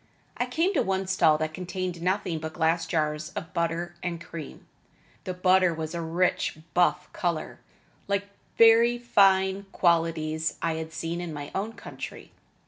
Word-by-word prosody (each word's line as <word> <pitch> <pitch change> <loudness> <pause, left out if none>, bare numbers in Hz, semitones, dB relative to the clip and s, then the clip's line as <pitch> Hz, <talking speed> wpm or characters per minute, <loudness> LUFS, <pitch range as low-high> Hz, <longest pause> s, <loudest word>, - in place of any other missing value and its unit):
I - - -1
came 350 +5 +1
to 315 - +2
one 190 0 0
stall 185 -5 +4
that 155 0 -2
contained 180 0 -4
nothing 180 -2 0
but 160 0 -6
glass 165 0 +1
jars 155 -2 -1
of 160 - -6
butter 170 +1 -1
and 175 -2 -3
cream. 165 -3 -9 0.6
The 185 - -3
butter 185 -1 +4
was 160 0 -4
a 170 - -3
rich 170 0 0 0.2
buff 180 0 +2
color, 175 -6 -2 0.5
like 200 0 0 0.3
very 230 +1 +6
fine 195 -4 +3
qualities 165 -2 +1
I 165 -1 0
had 160 0 -5
seen 165 +2 -3
in 175 -2 -5
my 145 -1 -6
own 215 +4 -2
country. - - -9
175 Hz, 155 wpm, -27 LUFS, 160-190 Hz, 0.6 s, very